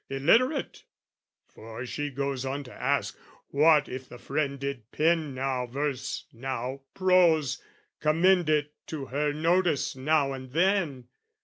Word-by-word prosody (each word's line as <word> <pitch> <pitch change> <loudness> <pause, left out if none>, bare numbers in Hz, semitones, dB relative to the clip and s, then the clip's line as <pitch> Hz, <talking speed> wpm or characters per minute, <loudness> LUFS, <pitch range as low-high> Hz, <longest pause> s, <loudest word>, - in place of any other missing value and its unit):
"Illiterate 230 - +2 0.6
for 115 +3 -9
she 145 +4 -3
goes 140 -1 -3
on 135 +2 -3
to 125 - -12
ask, - - -1 0.3
"What 150 +1 +4
if 130 0 -7
the 125 - -10
friend 140 +1 -2
did 135 -5 -5
pen 160 -3 +1
now 130 -1 -1
verse 135 +1 -3
now 130 +2 -4
prose, 175 -7 +3 0.4
"Commend 170 +2 +3
it 150 -1 +1
to 150 -4 -5
her 145 +3 -1
notice 165 0 +1
now 140 +1 +1
and 130 -1 -9
then? 165 -8 +1
145 Hz, 130 wpm, -28 LUFS, 130-160 Hz, 0.6 s, What